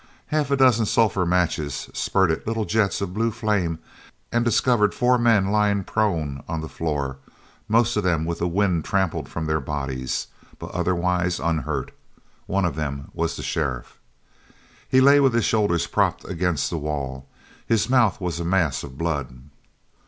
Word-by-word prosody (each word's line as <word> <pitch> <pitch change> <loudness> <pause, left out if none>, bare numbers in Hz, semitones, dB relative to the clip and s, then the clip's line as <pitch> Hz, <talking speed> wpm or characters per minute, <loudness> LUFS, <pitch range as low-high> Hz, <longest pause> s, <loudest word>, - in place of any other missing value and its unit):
Half 150 -2 +1
a 140 - +2
dozen 120 -5 +4
sulphur 100 -6 +2
matches 85 -5 0
spurted 95 -3 +1
little 110 -1 -1
jets 105 -2 +1
of 95 -2 -3
blue 115 +3 +1
flame 105 -7 -1 0.5
and 120 0 +2
discovered 120 -2 +2
four 125 0 +3
men 110 -5 +3
lying 105 -2 +2
prone 80 -11 -1
on 80 -1 -3
the 80 - -5
floor, 75 -5 -3 0.5
most 115 +2 +3
of 105 - 0
them 85 -3 +1
with 85 0 -3
the 85 - 0
wind 90 -2 +1
trampled 95 -3 -1
from 80 - -4
their 80 0 0
bodies, 70 -2 -3 0.3
but - - -8
otherwise 90 0 0
unhurt. 80 -2 -2 0.6
One 100 0 +1
of 85 - -1
them 70 -3 -4
was - - -2
the - - -6
sheriff. 65 -6 -3 0.9
He 130 - +5
lay 140 +2 +7
with 135 -4 +3
his 115 - +2
shoulders 105 -6 +1
propped - - 0
against 90 -4 -1
the 85 - -2
wall. 70 -3 -4 0.4
His 115 -2 +2
mouth 120 -7 +3
was 90 -3 -3
a - - -2
mass 85 -4 +1
of 65 -1 -10
blood. 70 -6 -3
90 Hz, 165 wpm, -23 LUFS, 80-110 Hz, 0.9 s, lay